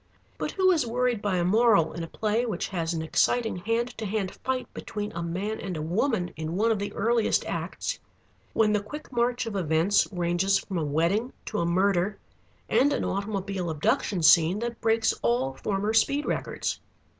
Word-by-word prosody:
But - - -1
who 375 -1 +4
is 315 -9 +1
worried 245 -1 0
by 205 -3 0
a 175 - +1
moral 205 -3 +4
in 170 - -5
a - - -5
play 215 +6 0
which 215 -7 -3
has 170 -4 -2
an 165 -2 -2
exciting 225 +7 +1
hand 230 +6 -1
to 220 - -3
hand 195 -2 -2
fight 260 -1 -1
between 210 0 -5
a 170 - -5
man 190 +6 -3
and 185 -4 -4
a - - -3
woman 180 - 0
in 160 +2 -4
one 225 +4 +2
of 215 - 0
the 205 0 -3
earliest 230 0 +1
acts, - - -3 0.5
when 215 -1 +3
the 210 - +2
quick 295 +9 -9
march 240 0 0
of 225 -3 -5
events 170 +2 +2
ranges 175 +2 +1
from 185 -3 -4
a - - -1
wedding 170 - 0
to 210 - -3
a 170 - 0
murder 190 +2 +1 0.5
and 285 +3 +3
an - - -1
automobile 195 -2 -2
abduction 160 +4 0
scene 165 +3 +6
that 235 +1 -4
breaks 225 0 +2
all 125 +3 +1
former 205 +7 -2
speed 280 +6 +2
records. - - -2
200 Hz, 190 wpm, -27 LUFS, 175-225 Hz, 0.5 s, scene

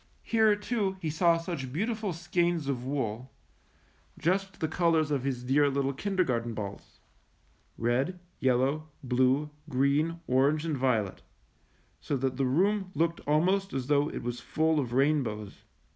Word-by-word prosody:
Here, 220 -2 +4
too, 205 -2 -2
he 160 -4 -2
saw 170 +1 +3
such 165 -6 -5
beautiful 215 - -1
skeins 170 -2 0
of 130 -3 -2
wool, 130 -2 -3 0.9
just 190 +4 -1
the 160 - 0
colors 160 -2 +2
of 140 -3 +1
his 130 -3 -2
dear 140 +3 +3
little 140 0 0
kin 195 +9 -3
dergarten 120 -10 0
balls 100 -2 -7 0.4
— - - -38
red, 135 +10 0 0.2
yellow, 135 +5 +1
blue, 130 +4 +2 0.2
green, 145 +5 +1
orange, 140 +4 +2
and 160 -3 -1
violet, 115 -7 0 0.8
so 140 - -2
that 130 0 -1
the 135 -2 +1
room 190 +8 +1
looked 165 +2 +1
almost 185 +6 +2
as 130 -2 -2
though 145 +1 +2
it - - -6
was 120 0 -3
full 155 +6 +1
of 125 -4 -2
rainbows. 125 -6 0
145 Hz, 150 wpm, -29 LUFS, 130-170 Hz, 0.9 s, Here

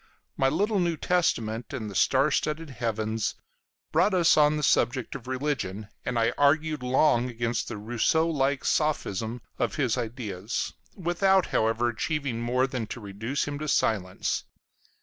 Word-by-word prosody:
My 135 - +2
little 205 +8 +1
New 170 -2 0
Testament 120 -12 0
and 115 -5 -4
the 105 - -7
star - - +3
studded 155 0 -1
heavens 110 -3 -2 0.6
brought 205 - +3
us 170 -2 +5
on 150 0 +4
the 150 - -3
subject 125 -1 +2
of 130 -2 -8
religion, 130 -7 -3
and 125 -1 -2
I 115 +1 +2
argued 155 +1 +3
long 125 -1 +3
against 120 0 -2
the - - -5
Rousseau 120 +9 +1
like 140 -3 0
sophism 120 -7 0 0.2
of - - 0
his 130 -4 +1
ideas, 110 -3 -4 0.2
without, 190 +1 +2
however, 115 +2 +2
achieving 130 0 -2
more 125 +2 +2
than 130 -4 -4
to 120 - -6
reduce 110 +8 -3
him 145 0 -4
to 155 - -4
silence. 95 -9 0
125 Hz, 150 wpm, -27 LUFS, 115-150 Hz, 0.6 s, us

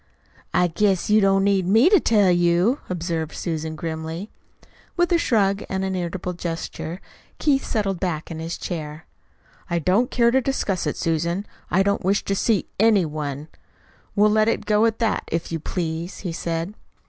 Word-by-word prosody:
"I 180 - +3
guess 190 +3 +1
you 215 0 +6
don't 195 0 +3
need 195 -2 +2
me 225 - +5
to 400 0 +6
tell 205 -8 +3
you," 175 +8 +3
observed 165 -3 -3
Susan 160 -2 -3
grimly. 160 +4 -5 0.7
With 350 +1 +2
a 340 - +4
shrug 200 -8 +2
and 190 0 -1
an 190 - -2
irritable 180 0 -3
gesture 170 0 -5 0.4
Keith 280 -3 +2
settled 195 -5 -1
back 170 -3 -3
in 160 - -5
his 165 +1 -4
chair. 155 -2 -6 0.6
"I 170 - 0
don't 185 +9 +2
care 235 -1 +3
to 265 +2 +3
discuss 200 - -1
it, 150 - -2
Susan. 170 +4 -1 0.2
I 190 +2 +3
don't 200 0 0
wish 195 +3 +1
to 195 - 0
see 215 +1 +1
ANY 210 -4 +4
one. 150 -1 -5 0.7
We'll 210 0 +4
let 215 0 +3
it 230 - 0
go 210 +1 +3
at 225 -1 -1
that, 230 -2 0
if 165 +1 -2
you 165 - -2
please," 165 +1 -4
he 175 - -1
said. 165 +3 -3
185 Hz, 175 wpm, -23 LUFS, 165-210 Hz, 0.7 s, you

